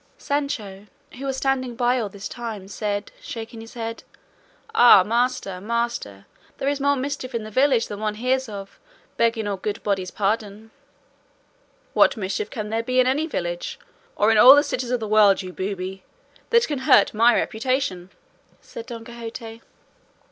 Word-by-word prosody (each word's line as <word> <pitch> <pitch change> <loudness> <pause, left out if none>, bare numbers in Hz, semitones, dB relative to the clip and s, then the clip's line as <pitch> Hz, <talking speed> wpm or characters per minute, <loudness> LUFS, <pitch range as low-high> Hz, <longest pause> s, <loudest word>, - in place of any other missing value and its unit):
Sancho, 225 -9 -3 0.3
who 275 - -5
was 265 -1 -2
standing 260 -2 -1
by 245 +1 +2
all 215 -4 -2
the 200 - -13
time, 220 -3 -6
said, 205 0 -3
shaking 225 0 -7
his 225 +2 -12
head, 230 -1 -5 0.7
"Ah! 240 - +8
master, 225 -4 -1
master, 230 - -3 0.3
there 270 - -3
is 285 0 0
more 285 +1 +2
mischief 265 -2 -4
in 230 - -2
the 215 - -9
village 260 0 +3
than 205 - -7
one 215 -1 -2
hears 255 +2 0
of, 200 -2 -9 0.4
begging 230 -2 +1
all 200 -1 -2
good 205 +2 -4
bodies' 195 -3 -1
pardon." 210 +2 -2 1.2
"What 275 - +4
mischief 205 - -3
can 215 -4 -5
there 225 +1 0
be 255 +2 0
in 255 - +5
any 285 +5 +1
village, 175 - -4 0.4
or 210 +2 +3
in 220 - +4
all 260 +5 +10
the 290 - +4
cities 250 -5 -3
of 250 -1 0
the 220 - -4
world, 205 -2 +4
you 185 -1 -8
booby, 190 0 -5 0.5
that 470 0 +4
can 295 -3 -2
hurt 235 -6 +4
my 230 +2 +5
reputation?" 220 -6 -1 0.5
said 230 +1 -10
Don 230 -2 -8
Quixote. 230 -1 -8
225 Hz, 170 wpm, -23 LUFS, 205-255 Hz, 1.2 s, all